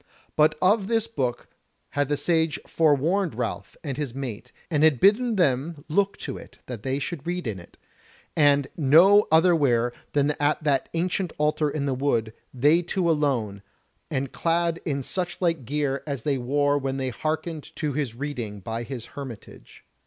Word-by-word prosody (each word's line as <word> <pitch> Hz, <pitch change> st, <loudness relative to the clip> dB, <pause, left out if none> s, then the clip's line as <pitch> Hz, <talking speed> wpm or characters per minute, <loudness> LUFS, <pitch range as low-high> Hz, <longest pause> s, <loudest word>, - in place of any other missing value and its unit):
But 155 Hz, 0 st, +4 dB
of 195 Hz, +1 st, +3 dB
this 225 Hz, -1 st, +1 dB
book 130 Hz, -, -3 dB, 0.4 s
had 145 Hz, -1 st, -1 dB
the 145 Hz, -, +1 dB
Sage 160 Hz, +1 st, +1 dB
forewarned 165 Hz, +4 st, +2 dB
Ralph -, -, -4 dB
and 140 Hz, -4 st, -4 dB
his 140 Hz, -5 st, -4 dB
mate, 125 Hz, -5 st, -6 dB, 0.2 s
and 150 Hz, -2 st, +2 dB
had 155 Hz, -6 st, +5 dB
bidden 220 Hz, -, +4 dB
them 145 Hz, -2 st, 0 dB
look 200 Hz, +5 st, +1 dB
to 135 Hz, -, -5 dB
it -, -, -14 dB
that 120 Hz, -5 st, -7 dB
they 130 Hz, +3 st, -1 dB
should 150 Hz, +2 st, -5 dB
read 180 Hz, 0 st, -2 dB
in 105 Hz, -5 st, -3 dB
it, 85 Hz, -, -16 dB, 0.6 s
and 145 Hz, -2 st, +4 dB
no 170 Hz, +8 st, +6 dB
otherwhere 145 Hz, -8 st, +4 dB, 0.2 s
than 145 Hz, 0 st, +2 dB
at 145 Hz, +1 st, +1 dB
that 140 Hz, -3 st, +1 dB
ancient 180 Hz, +1 st, -1 dB
altar 150 Hz, 0 st, +1 dB
in 145 Hz, -1 st, -2 dB
the 135 Hz, -, 0 dB
wood, 120 Hz, -5 st, 0 dB, 0.2 s
they 145 Hz, +7 st, +3 dB
two 175 Hz, +1 st, -1 dB
alone, 130 Hz, -11 st, 0 dB, 0.5 s
and 135 Hz, 0 st, -2 dB
clad 170 Hz, 0 st, 0 dB
in 140 Hz, -4 st, -1 dB
such 180 Hz, +4 st, -3 dB
like 165 Hz, -7 st, 0 dB
gear 140 Hz, +1 st, -1 dB
as 140 Hz, -5 st, -4 dB
they 140 Hz, -3 st, 0 dB
wore 145 Hz, +3 st, +1 dB
when 135 Hz, -1 st, -2 dB
they 130 Hz, -1 st, -1 dB
hearkened 155 Hz, +5 st, -3 dB
to 150 Hz, -3 st, -2 dB
his 135 Hz, -5 st, -2 dB
reading 120 Hz, -7 st, -5 dB
by 115 Hz, +4 st, -4 dB
his 120 Hz, -1 st, -6 dB
hermitage. 130 Hz, -7 st, -10 dB
145 Hz, 170 wpm, -25 LUFS, 130-165 Hz, 0.6 s, no